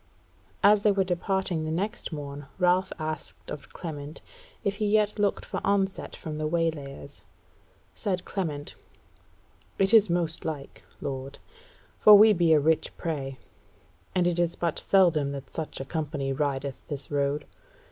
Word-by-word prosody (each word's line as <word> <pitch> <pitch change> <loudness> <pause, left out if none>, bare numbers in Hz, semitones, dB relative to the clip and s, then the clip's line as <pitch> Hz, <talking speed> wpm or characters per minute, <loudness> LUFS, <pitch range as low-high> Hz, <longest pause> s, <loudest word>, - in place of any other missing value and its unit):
As 205 +1 +6
they 210 - +4
were 195 -1 +2
departing 180 -2 -1
the 155 - -3
next 200 +8 -2
morn 145 -2 -6
Ralph 180 0 +3
asked 155 0 -6
of 145 - -8
Clement 150 -3 -7 0.4
if 200 0 -1
he 210 - 0
yet 210 0 +2
looked 205 -1 +1
for - - -4
onset 195 -1 0
from 155 -3 -6
the 155 - 0
waylayers. 155 - -3 0.7
Said 185 -3 -2
Clement: 155 -7 -3 1.0
"It 195 +2 +2
is 215 -4 +7
most 170 -1 0
like, 145 -4 -5 0.2
lord; 135 0 -5 0.6
for 210 - +10
we 215 +1 +8
be 170 -3 +3
a 155 - +7
rich 160 +2 +1
prey, 135 -5 -3 0.8
and 180 -1 +3
it 175 -1 +1
is 170 -1 +1
but 170 -2 -1
seldom 165 -7 +3
that 135 -1 -8
such 160 -2 -5
a 135 - -4
company 145 -3 -2
rideth 140 -1 -2
this 145 -1 -5
road. 145 +1 0
160 Hz, 150 wpm, -27 LUFS, 145-190 Hz, 1.0 s, for